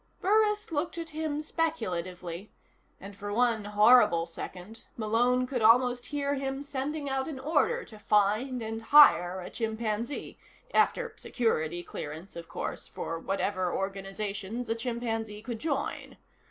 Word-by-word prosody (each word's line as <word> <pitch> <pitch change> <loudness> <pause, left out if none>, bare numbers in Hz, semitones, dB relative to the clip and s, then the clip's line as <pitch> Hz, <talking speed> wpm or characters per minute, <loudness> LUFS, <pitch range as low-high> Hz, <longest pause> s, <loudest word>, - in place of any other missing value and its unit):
Burris 420 0 +2
looked 320 +2 -2
at 330 -1 -5
him 305 -1 -2
speculatively, 185 - -3 0.5
and 200 +1 -10
for 205 +1 -6
one 230 -1 +2
horrible 210 -5 +5
second 180 +5 -9
Malone 240 +3 +2
could 250 -2 -3
almost 245 +2 +4
hear 285 -1 -1
him 270 0 -3
sending 285 +1 -3
out 270 -1 -1
an 305 -4 -5
order 335 - +1
to 215 - -13
find, 215 +5 +1
and 225 0 -4
hire, 190 -10 +6
a 180 - -8
chimpanzee 225 +2 -3 0.3
(after 475 -2 +2
Security 175 -8 -1
clearance, 160 +5 -7
of 170 -1 -8
course, - - -5
for 165 0 -5
whatever 185 0 -1
organizations 195 +4 -4
a - - +3
chimpanzee 225 -3 -3
could 230 -1 -5
join). 280 -1 -3
225 Hz, 135 wpm, -29 LUFS, 200-275 Hz, 0.5 s, hire